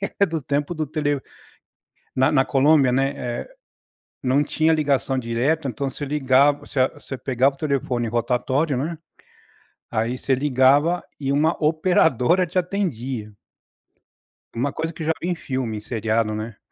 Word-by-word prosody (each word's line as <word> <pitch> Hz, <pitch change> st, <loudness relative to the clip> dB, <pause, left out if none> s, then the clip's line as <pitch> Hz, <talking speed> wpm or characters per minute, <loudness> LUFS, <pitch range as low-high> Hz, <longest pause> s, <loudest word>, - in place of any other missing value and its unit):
ela 195 Hz, -, -3 dB
é 200 Hz, -, +6 dB
do 160 Hz, -4 st, -3 dB
tempo 145 Hz, +5 st, -1 dB
do 155 Hz, -1 st, -2 dB
tele 145 Hz, -2 st, -1 dB, 1.0 s
na 130 Hz, +4 st, +3 dB
na 135 Hz, -2 st, +4 dB
Colômbia, 140 Hz, 0 st, +4 dB
né, 135 Hz, +2 st, +1 dB
eh, 120 Hz, -2 st, -4 dB, 0.8 s
não 130 Hz, +3 st, +3 dB
tinha 160 Hz, +2 st, +2 dB
ligação 140 Hz, -3 st, +1 dB
direta, 130 Hz, +6 st, 0 dB
então, 135 Hz, +3 st, -3 dB
você 145 Hz, +3 st, -6 dB
ligav 140 Hz, 0 st, +3 dB
você 130 Hz, -2 st, +1 dB
você 135 Hz, -, -8 dB
pegava 130 Hz, +2 st, +1 dB
o -, -, -25 dB
telefone 130 Hz, -5 st, -1 dB
rotatório, 125 Hz, +5 st, 0 dB
né. 160 Hz, +6 st, -3 dB, 1.0 s
Aí, 115 Hz, +3 st, 0 dB
você 135 Hz, -, 0 dB
ligava 140 Hz, +5 st, +3 dB, 0.2 s
e 135 Hz, -1 st, -1 dB
uma 155 Hz, +3 st, +3 dB
operadora 160 Hz, 0 st, +3 dB
te 180 Hz, +2 st, -4 dB
atendia. 135 Hz, -, -2 dB, 1.2 s
Uma 135 Hz, +4 st, -1 dB
coisa 165 Hz, +1 st, -3 dB
que 155 Hz, 0 st, -6 dB
já 160 Hz, -, +2 dB
vi 175 Hz, -, -2 dB
em 180 Hz, -, +1 dB
filme 130 Hz, -8 st, -3 dB
e -, -, -5 dB
seriado, 110 Hz, 0 st, -1 dB
né. 110 Hz, 0 st, -5 dB
135 Hz, 155 wpm, -22 LUFS, 125-155 Hz, 1.2 s, é